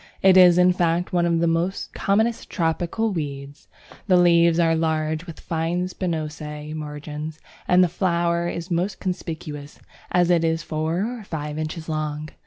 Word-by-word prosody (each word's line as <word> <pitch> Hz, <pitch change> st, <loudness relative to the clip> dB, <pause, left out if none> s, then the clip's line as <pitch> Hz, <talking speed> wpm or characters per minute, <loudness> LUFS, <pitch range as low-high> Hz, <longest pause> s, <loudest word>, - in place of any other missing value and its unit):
It 190 Hz, -1 st, +7 dB
is 180 Hz, -2 st, +7 dB
in 180 Hz, 0 st, +5 dB
fact 175 Hz, 0 st, 0 dB
one 175 Hz, -1 st, +2 dB
of 170 Hz, -1 st, +2 dB
the 170 Hz, +3 st, 0 dB
commonest 220 Hz, +4 st, 0 dB
tropical 175 Hz, +6 st, -1 dB
weeds. 140 Hz, -4 st, -6 dB, 0.4 s
The 185 Hz, -2 st, +5 dB
leaves 170 Hz, -1 st, +5 dB
are 165 Hz, -1 st, +3 dB
large 160 Hz, +1 st, -1 dB
with 165 Hz, -, -9 dB
fine 165 Hz, +2 st, -2 dB
spinose 150 Hz, -4 st, -4 dB
margins, 150 Hz, 0 st, -6 dB, 0.3 s
and 180 Hz, 0 st, +5 dB
the -, -, +4 dB
flower 170 Hz, -1 st, 0 dB
is 170 Hz, +2 st, -6 dB
most 180 Hz, +4 st, -1 dB
conspicuous, 155 Hz, -5 st, -5 dB, 0.3 s
as 180 Hz, -1 st, +3 dB
it 170 Hz, -2 st, +3 dB
is 165 Hz, 0 st, 0 dB
four 160 Hz, +4 st, -1 dB
or -, -, -10 dB
five 150 Hz, -4 st, -5 dB
inches 155 Hz, +1 st, -5 dB
long. 155 Hz, -1 st, -3 dB
165 Hz, 155 wpm, -23 LUFS, 155-180 Hz, 0.4 s, It